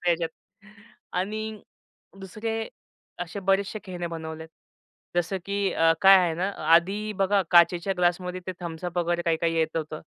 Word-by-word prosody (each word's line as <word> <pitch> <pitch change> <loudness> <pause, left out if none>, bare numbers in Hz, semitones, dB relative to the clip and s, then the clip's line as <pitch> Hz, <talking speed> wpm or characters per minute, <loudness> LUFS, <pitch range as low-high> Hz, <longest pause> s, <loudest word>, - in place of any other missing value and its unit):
ह्याच्यात" 170 -1 +2 0.8
आणि 215 +3 -3 0.6
दुसरे 220 +4 -4 0.6
असे 180 +4 -7
बरेचसे 195 +2 +1
खेळणे 175 -2 -5
बनवले 160 -1 -6
आहेत. 160 - -11 0.7
जसं 175 +2 0
की 200 -1 0
अ, 165 0 +4
काय 195 0 +9
आहे 175 -3 +1
ना, 185 +4 -1 0.3
आधी 200 +5 +2
बघा 195 0 +3
काचेच्या 175 +2 +5
ग्लासमध्ये 180 +1 0
ते 185 - -3
Thums 170 0 -6
Up 175 0 -5
वगैरे 175 0 0
काही-काही 165 0 0
येत 160 0 0
होतं. 155 -1 -4
180 Hz, 150 wpm, -26 LUFS, 170-195 Hz, 0.8 s, काय